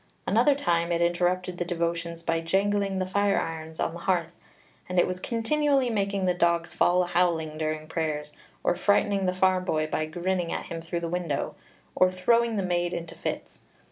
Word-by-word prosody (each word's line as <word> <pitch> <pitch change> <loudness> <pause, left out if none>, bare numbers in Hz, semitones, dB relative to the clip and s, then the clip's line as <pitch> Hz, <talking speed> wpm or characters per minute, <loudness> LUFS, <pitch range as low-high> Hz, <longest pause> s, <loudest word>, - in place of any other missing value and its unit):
Another 240 +8 +4
time 170 -10 0
it 170 - +1
interrupted 175 +1 0
the - - +1
devotions 170 -1 -2
by 165 0 +1
jangling 195 +3 +1
the 185 - 0
fire 200 +1 +2
irons 160 0 -5
on - - 0
the 170 - -7
hearth; 170 -2 0 0.6
and 180 - -3
it 175 - +6
was 185 0 -3
continually 265 +4 +1
making 200 -2 0
the 180 - +3
dogs 170 -1 +1
fall 180 +1 +3
a - - -2
howling 170 -3 +1
during 155 0 -2
prayers, 155 -2 -3 0.3
or - - +2
frightening 200 -1 +2
the - - +3
farm 185 0 +3
boy 155 -4 0
by 155 0 -2
grinning 175 +1 -1
at - - -3
him 165 -1 -6
through 170 +1 -4
the 170 - -2
window, 165 -4 -2 0.4
or 185 - +4
throwing 230 +5 +2
the 195 - 0
maid 175 -1 0
into 170 -1 -5
fits. - - -5
175 Hz, 190 wpm, -27 LUFS, 165-190 Hz, 0.6 s, it